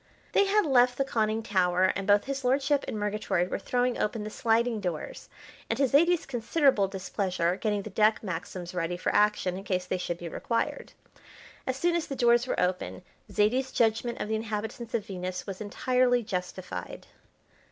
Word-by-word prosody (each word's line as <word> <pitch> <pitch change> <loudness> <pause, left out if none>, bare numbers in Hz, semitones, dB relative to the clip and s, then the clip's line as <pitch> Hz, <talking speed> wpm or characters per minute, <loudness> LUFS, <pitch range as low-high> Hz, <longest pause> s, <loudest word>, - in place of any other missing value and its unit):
They 400 - +4
had 415 +1 +3
left 250 -3 +4
the 275 - +1
conning 220 -3 0
tower, 185 -2 +2
and 195 0 -4
both 205 0 +5
his 275 0 -3
lordship 275 +3 +2
and - - -3
Murgatroyd 205 -4 -1
were - - -1
throwing 245 +3 0
open 210 0 -1
the 215 - -6
sliding 230 +1 +1
doors 175 -5 -5 0.4
and, 225 - 0
to 275 0 +3
Zaidie's 335 +6 +3
considerable 255 -3 +2
displeasure, 185 -2 -1
getting 205 0 -1
the 215 - -8
deck 215 +3 +3
Maxims 180 -1 -5
ready 175 0 -2
for - - -1
action 205 -3 +2
in - - -9
case 185 -2 -1
they 185 0 -2
should 175 -1 -3
be 175 - -7
required. 230 +7 -2 0.7
As 260 0 -1
soon 345 +4 +1
as 340 - -1
the 275 - -4
doors 240 0 +3
were - - -1
open 180 0 -1 0.3
Zaidie's 250 +6 +1
judgment 230 +1 +1
of - - -3
the 220 - -2
inhabitants 220 +1 -4
of 220 - -1
Venus 185 -1 -5
was 195 0 -6
entirely 245 +3 +1
justified. 180 - -5
215 Hz, 180 wpm, -28 LUFS, 185-245 Hz, 0.7 s, both